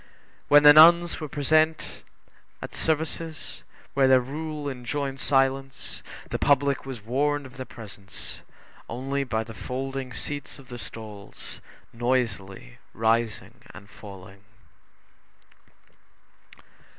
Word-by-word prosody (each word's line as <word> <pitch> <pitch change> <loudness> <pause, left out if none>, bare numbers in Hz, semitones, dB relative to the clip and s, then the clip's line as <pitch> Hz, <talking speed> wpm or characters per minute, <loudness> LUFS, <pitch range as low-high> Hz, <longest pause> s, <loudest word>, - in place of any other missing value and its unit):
When 145 0 +7
the 150 0 +11
nuns 170 +2 +7
were 155 - -4
present 155 +3 +1 0.6
at - - -8
services 160 0 -3 0.3
where 135 -1 +4
their 130 -1 +7
rule 150 +3 -5
enjoined 135 +1 -3
silence, 135 0 0 0.3
the - - -1
public 140 -1 +2
was 120 -6 -7
warned 145 +4 0
of 130 0 -13
their 130 - -6
presence 100 -3 -8 0.5
only 135 +4 -2
by 110 -4 -1
the 115 0 -10
folding 130 +4 -4
seats 145 +4 -5
of 135 -3 -15
the 120 -1 -7
stalls 105 -4 -9 0.3
noisily 115 - -2 0.2
rising 115 -1 0
and 100 - -12
falling. 100 -1 -12
135 Hz, 110 wpm, -26 LUFS, 115-145 Hz, 0.6 s, the